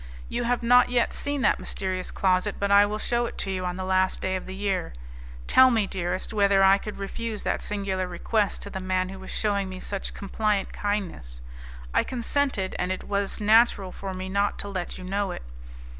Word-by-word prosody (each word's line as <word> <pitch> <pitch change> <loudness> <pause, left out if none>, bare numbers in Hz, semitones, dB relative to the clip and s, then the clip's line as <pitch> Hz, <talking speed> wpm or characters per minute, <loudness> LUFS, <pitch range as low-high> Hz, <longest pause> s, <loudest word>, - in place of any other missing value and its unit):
You 240 - -2
have 245 0 0
not 245 +1 +6
yet 245 -1 +1
seen 285 -2 -2
that - - +3
mysterious 185 -1 -3
closet, 190 +1 +1
but 200 0 -1
I 200 +1 +7
will 210 +1 -3
shew 240 +2 0
it - - -9
to 195 - -2
you 185 -1 -2
on 180 - -3
the 185 - -3
last 185 0 +2
day 190 0 -1
of 185 - -5
the 190 - -6
year. 195 - -2 0.5
Tell 260 - +7
me, 225 -4 +2
dearest, 185 +1 -3
whether 200 -2 +4
I 195 +1 +6
could 210 - -7
refuse 215 +2 -4
that - - -1
singular 195 -2 -2
request 200 +4 0
to 200 - -8
the 190 - -4
man 185 0 -1
who 190 0 -8
was 190 - -10
shewing 200 -2 0
me 185 0 -7
such 200 +1 -4
compliant 205 0 -1
kindness? 180 - -3 0.5
I - - +3
consented, 255 -5 -1
and 180 - 0
it 185 - -3
was 200 -1 -1
natural 215 -3 +4
for 190 0 -6
me 185 0 -5
not 200 +2 0
to 205 - -6
let 185 -3 -4
you 185 - -9
know 195 +2 -1
it. 180 - -6
200 Hz, 210 wpm, -26 LUFS, 185-210 Hz, 0.5 s, I